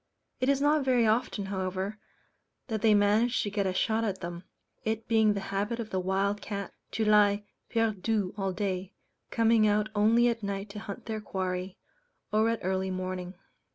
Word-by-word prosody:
It 255 +1 +1
is 280 -1 +3
not 295 +1 +3
very 250 -3 +3
often, 220 -2 +1
however, 190 +2 -3 0.7
that 220 -2 -2
they 215 -1 +5
manage 210 +4 +3
to 205 - -3
get 200 -1 0
a - - +1
shot 220 +3 +1
at 195 -4 -2
them, 175 +1 -6 0.4
it 220 0 -2
being 220 -2 +4
the - - -1
habit 205 +4 -1
of 225 -2 -5
the 190 - 0
wild 195 +2 0
cat 200 -2 -5 0.2
to 220 - 0
lie 210 -1 +4 0.3
perdu 215 -3 0
all 195 -2 -1
day, 190 0 -3 0.3
coming 225 -1 +4
out 210 +1 +2
only 225 +3 +4
at 235 -1 0
night 200 0 -4
to 210 - -7
hunt 205 -2 -7
their 220 -2 -3
quarry, 185 -2 -3 0.5
or 215 +2 +3
at 230 - -1
early 190 +1 0
morning. 185 0 -4
205 Hz, 180 wpm, -29 LUFS, 190-225 Hz, 0.7 s, they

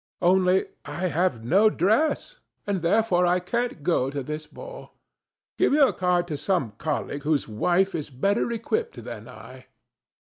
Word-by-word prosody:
Only 185 +1 +4 0.2
I 185 +1 -3
have 165 -7 0
no 200 - +5
dress, 290 - +1 0.3
and 200 -3 -1
therefore 180 0 +2
I 180 +1 +3
can't 235 - -3
go 140 -5 +1
to 140 -1 -4
this 150 +3 -6
ball. - - -11 0.6
Give - - +3
your 285 -2 +5
card 180 -1 +1
to 150 - -3
some 175 - 0
colleague 145 -2 -3
whose 150 -1 0
wife 175 - +1
is 150 -3 -4
better 200 - 0
equipped 440 - -3
than - - -8
I." - - -13
180 Hz, 150 wpm, -25 LUFS, 155-215 Hz, 0.6 s, no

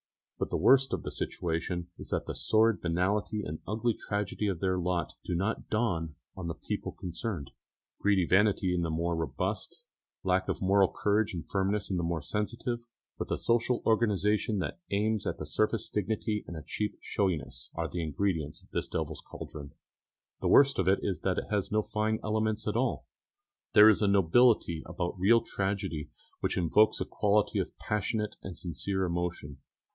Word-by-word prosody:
But - - -1
the - - 0
worst 135 0 +5
of - - -2
the - - -4
situation 85 +1 -2
is - - -7
that - - -1
the - - -4
sordid 110 0 +3
banality 100 +5 0
and 75 +1 -5
ugly 115 +3 +1
tragedy 105 0 -2
of 95 -4 -1
their 95 -1 +1
lot 90 -1 -1
do 90 - -2
not 100 +6 -2
dawn 85 -9 0 0.2
on 95 -3 -5
the 80 - -3
people - - -4
concerned. 90 - -4 0.5
Greedy 100 -3 +3
vanity 95 0 +3
in 90 - +1
the 85 - -1
more 85 +2 0
robust, 80 -5 -3 0.4
lack 95 0 +1
of - - -1
moral 95 0 +4
courage 105 -1 +1
and 80 -2 -6
firmness 100 +1 0
in 95 - +1
the 85 - -1
more 85 -2 -1
sensitive, 115 +6 -3 0.3
with - - -3
a - - 0
social 120 +1 +1
organisation 105 -1 +2
that 95 - -3
aims 105 +1 0
at 85 - -3
a 75 - -4
surface 110 +8 +1
dignity 105 +1 -1
and 85 - -6
a 80 - -7
cheap 105 +5 -3
showiness, 80 -11 -2
are 85 0 -1
the 85 - -3
ingredients 80 -1 -2
of - - -24
this - - -2
devil's - - -3
cauldron. 70 -1 -9 0.7
The - - -1
worst 140 -4 +6
of 95 - +1
it 95 +1 +5
is 95 -3 -2
that 95 -1 0
it - - -3
has 105 -2 0
no 110 0 +2
fine 110 +1 0
elements 110 0 0
at 105 - 0
all. 125 +1 0 0.7
There 105 +1 +9
is 110 - +3
a 105 - +3
nobility 100 -2 +4
about 85 +2 -3
real 115 +5 +5
tragedy 95 -5 -3 0.3
which - - -1
evokes 95 +5 +4
a - - -1
quality 105 0 +1
of - - -4
passionate 105 +1 -2
and 95 - -7
sincere 95 +4 -2
emotion. 85 -5 -3
95 Hz, 180 wpm, -30 LUFS, 85-105 Hz, 0.7 s, There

